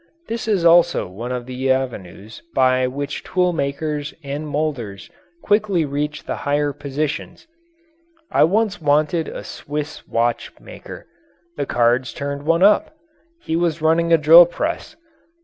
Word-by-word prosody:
This 230 0 -4
is 195 -6 +1
also 175 0 +5
one 115 +7 -7
of 125 -1 -4
the 130 +1 -3
avenues 110 -5 -4
by 130 -1 +3
which 140 +2 -5
tool 180 -1 0
makers 145 0 -3
and 145 +2 -5
moulders 140 - -4 0.3
quickly 205 -5 +1
reach 150 +1 -3
the - - -4
higher 145 0 0
positions. 145 +1 -4 0.9
I - - +5
once 205 +2 0
wanted 150 +2 +1
a - - -7
Swiss 150 +1 -6
watch 115 0 -1
maker. - - -11 0.5
The 140 -1 -3
cards 120 +1 +1
turned 140 +1 -5
one 165 +2 +3
up 210 +9 +4 0.5
he 160 - -2
was 165 -2 -1
running 165 +1 +2
a 165 - +7
drill 165 +3 +8
press. 310 - -4
150 Hz, 140 wpm, -20 LUFS, 130-170 Hz, 0.9 s, drill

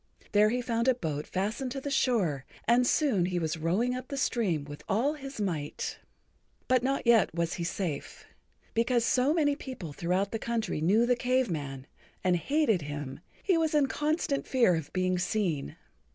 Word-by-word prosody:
There 210 0 +5
he 245 +2 -1
found 235 0 0
a 260 - +5
boat 155 - -3
fastened 220 +7 -2
to 275 - -3
the 280 +1 -5
shore, 190 - +1 0.2
and 240 +2 +4
soon 245 - +2
he 180 -1 -2
was 160 -2 -1
rowing 185 +10 +1
up 255 0 -5
the 280 - -5
stream 210 - 0
with 145 0 -10
all 250 +9 +2
his 275 -4 -8
might. 165 -8 -3 0.7
But 255 -1 +4
not 270 +1 -1
yet 230 -8 +4
was 170 0 0
he 170 - -3
safe. 170 -4 -4 0.5
Because 235 +1 +2
so 265 0 +3
many 300 -3 +2
people 255 - -7
throughout 180 +6 0
the 225 - -2
country[Pg 225 -8 -2
65] - - -3
knew 210 +8 +4
the 245 0 +3
Cave 255 -2 +1
Man 135 -4 -4 0.4
and 180 -1 +3
hated 230 - +1
him, 145 -2 -6 0.2
he 370 -4 +3
was 315 -1 +1
in 295 -2 +5
constant 295 0 -1
fear 240 -8 +4
of 160 -3 -5
being 185 -1 0
seen. 175 - -1
220 Hz, 185 wpm, -29 LUFS, 170-255 Hz, 0.7 s, There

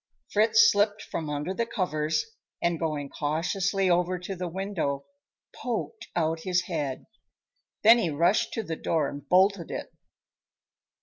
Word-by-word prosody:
Fritz 220 +1 +5
slipped 205 +1 +1
from 160 -2 -4
under 150 +5 -2
the 230 +4 -1
covers, 155 -7 -1 0.3
and 170 -1 0
going 150 -3 -2
cautiously 180 +7 0
over 180 +1 +2
to 180 +2 -6
the 180 0 -4
window, 170 -6 -3 0.5
poked 230 -1 -4
out 160 -1 +1
his 180 +1 0
head. 150 -7 -3 0.8
Then 230 +3 +8
he 195 - 0
rushed 170 +7 +2
to 225 - -2
the 165 -5 -4
door 160 0 0
and 145 -1 -9
bolted 190 -1 +3
it. - - -6
175 Hz, 140 wpm, -27 LUFS, 155-195 Hz, 0.8 s, Then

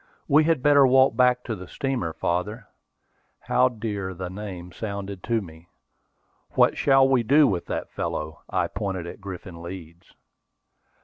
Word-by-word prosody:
"We 150 +2 +5
had 160 -6 +1
better 145 -2 +6
walk 130 -1 +4
back 125 0 +3
to 115 - -4
the 90 -2 -10
steamer, 130 -8 -2
father," 100 +8 -2 0.8
how 130 +1 +3
dear 105 -5 -4
the 90 0 -6
name 95 -3 -7
sounded 100 -2 -6
to 115 -2 +1
me! 80 -2 -13 0.9
"What - - +4
shall 135 -1 +4
we 130 -2 +3
do 145 +6 +5
with 95 -8 -1
that - - -4
fellow?" 75 0 -4
I - - +1
pointed 95 -3 -4
at 85 - -9
Griffin 90 -3 -8
Leeds. 85 -1 -10
100 Hz, 150 wpm, -25 LUFS, 90-125 Hz, 0.9 s, better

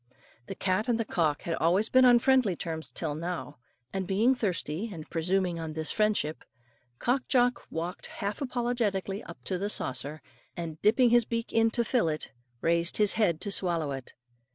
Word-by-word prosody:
The 195 - -5
cat 190 +6 0
and 235 -1 +2
the 230 - 0
cock 160 -7 0
had 170 - -2
always 185 +7 +3
been 255 +1 +5
on 245 -1 +7
friendly 250 -6 +3
terms 160 -1 -5
till 155 -3 -3
now; 165 -2 -5 0.3
and 190 -2 -2
being 215 +7 +3
thirsty, 190 - -2
and 160 -5 -8
presuming 180 +1 0
on 160 -1 -5
this 160 0 0
friendship, 210 -8 0 0.5
Cock 250 - 0
Jock 245 -1 +2
walked 170 +3 -5
half 200 +5 -4
apologetically 235 -6 -1
up 170 - -9
to 185 -2 -2
the 200 +2 -2
saucer, 140 -2 -3 0.3
and 160 -2 -6
dipping 230 +3 +4
his 240 -1 +5
beak 230 0 -3
in 225 0 +4
to 235 +1 0
fill 230 -7 +2
it, 155 -2 -4 0.3
raised 170 +1 +2
his 210 -2 +5
head 175 -8 +2
to 200 - -2
swallow 170 -6 0
it. 135 -2 -7
190 Hz, 180 wpm, -29 LUFS, 165-230 Hz, 0.5 s, on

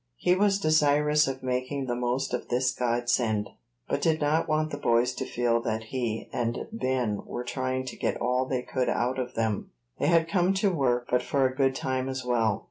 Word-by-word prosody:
He 180 - +3
was 195 +1 +3
desirous 150 -3 +3
of 130 -1 -4
making 130 +2 -2
the 120 -1 -2
most 125 +2 -1
of 125 - -2
this 125 +1 +1
godsend, 120 -3 0 0.4
but - - -1
did 160 -1 +2
not 155 +2 +1
want 155 0 +1
the 145 - -4
boys 120 -1 +2
to - - -4
feel 120 -1 +1
that 110 -1 -2
he 120 -4 -2
and 120 0 -2
Ben 130 - -1
were 120 - -5
trying 130 +1 -2
to 130 - -6
get - - -2
all 125 +2 0
they 130 -2 -1
could 130 0 -1
out 125 +2 0
of 125 0 -4
them. 110 -2 -1 0.3
They - - +1
had 165 0 +4
come 180 +2 +2
to 195 0 +2
work, 125 -5 +1
but 125 0 +3
for 135 +1 +1
a 130 - +1
good 135 -1 +2
time 130 0 -2
as 130 -1 -4
well. 115 -4 +1
130 Hz, 210 wpm, -27 LUFS, 120-145 Hz, 0.4 s, had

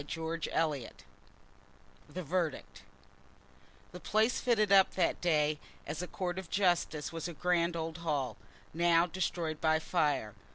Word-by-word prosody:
Chapter 160 +3 -4
XLIII 150 -7 0 1.2
The 185 - -5
Verdict 170 -1 -2 1.1
The 180 - -8
place 220 +5 +1
fitted 215 -5 +2
up 195 -1 +6
that 180 - +1
day 155 -3 +2 0.3
as 160 - -4
a 180 - -4
court 180 0 -3
of 190 - -9
justice 175 -6 +1
was 165 +1 -4
a 175 - -6
grand 170 +1 +1
old 165 0 -4
hall, 145 -8 -1 0.4
now 170 +1 +4
destroyed 170 -3 -2
by 160 0 +4
fire. 150 - 0
170 Hz, 135 wpm, -32 LUFS, 155-180 Hz, 1.2 s, up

